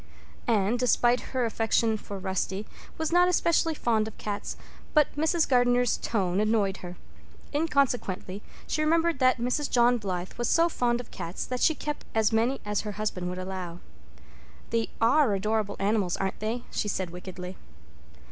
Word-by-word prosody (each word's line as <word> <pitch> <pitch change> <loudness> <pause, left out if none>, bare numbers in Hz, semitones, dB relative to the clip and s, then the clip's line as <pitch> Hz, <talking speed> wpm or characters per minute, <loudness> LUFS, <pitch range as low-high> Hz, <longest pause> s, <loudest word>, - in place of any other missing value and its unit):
Anne, 215 +1 +2
despite 245 0 +3
her 255 -2 -2
affection 225 0 +1
for 205 -1 -7
Rusty, 190 +1 -2 0.3
was 320 0 -1
not 355 +1 +5
especially 335 -2 +2
fond 220 -5 +1
of 220 - -9
cats, 205 -1 -4 0.4
but 300 -1 +4
Mrs. 320 +2 +2
Gardner's 245 -2 +3
tone 190 -4 0
annoyed 210 -3 +1
her. 180 0 -8 0.6
Inconsequently 250 - 0 0.2
she 305 - -1
remembered 330 0 +2
that 255 -1 +4
Mrs. 250 +4 -1
John 245 0 +4
Blythe 185 -3 -4
was 240 - 0
so 335 +1 +4
fond 240 -5 0
of 240 - -16
cats 175 0 -5
that 250 -1 -4
she 320 - +4
kept 295 0 -4
as 220 0 +3
many 235 +5 +2
as 210 -1 0
her 210 -1 -5
husband 195 -4 -3
would 180 - -5
allow. 185 -2 -5 0.9
"They 230 -1 0
are 235 -1 +4
adorable 210 +1 -1
animals, 200 -3 +1
aren't 190 0 -2
they?" 225 +3 -2
she - - -1
said 185 -3 -2
wickedly. 180 +1 -7
225 Hz, 160 wpm, -27 LUFS, 195-255 Hz, 0.9 s, not